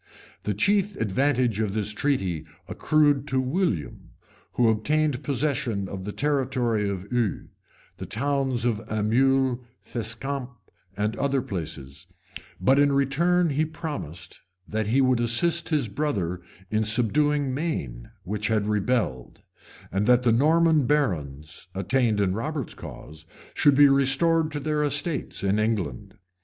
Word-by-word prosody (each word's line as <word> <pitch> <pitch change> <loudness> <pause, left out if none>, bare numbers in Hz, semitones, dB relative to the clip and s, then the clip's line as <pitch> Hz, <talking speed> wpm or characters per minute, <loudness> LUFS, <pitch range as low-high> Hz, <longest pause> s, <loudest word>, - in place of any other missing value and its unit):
The 105 - -1
chief 200 - +2
advantage 120 +1 +1
of 105 -3 -1
this 105 -1 0
treaty 95 - -1 0.2
accrued 145 -2 +2
to 130 -3 +1
William, 130 - -2 0.4
who 120 - +3
obtained 145 +5 +1
possession 130 -8 -1
of 95 0 -7
the 105 - -4
territory 125 -6 0
of 95 -1 -4
Eu, 120 -4 -1 0.5
the 95 0 -7
towns 135 +1 -1
of 115 -4 +1
Aumule, 125 +4 +2 0.2
Fescamp, 125 +3 -3 0.5
and 105 +2 -1
other 140 -2 0
places; 75 -7 -6 0.5
but 130 +10 +3
in 145 0 +4
return 160 +5 +2
he 145 +3 +1
promised, 155 - -6 0.3
that 110 -1 -2
he 130 +5 +3
would 130 -2 +3
assist 155 +9 +1
his 150 -7 +1
brother 100 - -2 0.3
in 110 0 +1
subduing 135 +6 +2
Maine, 70 - -4
which 105 +2 -3
had 110 -2 +1
rebelled; 105 - -1 0.5
and 100 +3 0
that 125 0 +5
the 120 - +3
Norman 155 +3 +3
barons, 75 - -2
attainted 110 +1 +1
in 95 - 0
Robert's 140 +4 -4
cause, 80 +1 -11 0.3
should 145 -2 +4
be 145 +1 +7
restored 145 +4 +3
to 145 - -3
their 150 +1 -1
estates 145 - -1
in 100 +2 +1
England. 110 -1 -2
125 Hz, 135 wpm, -25 LUFS, 105-145 Hz, 0.5 s, be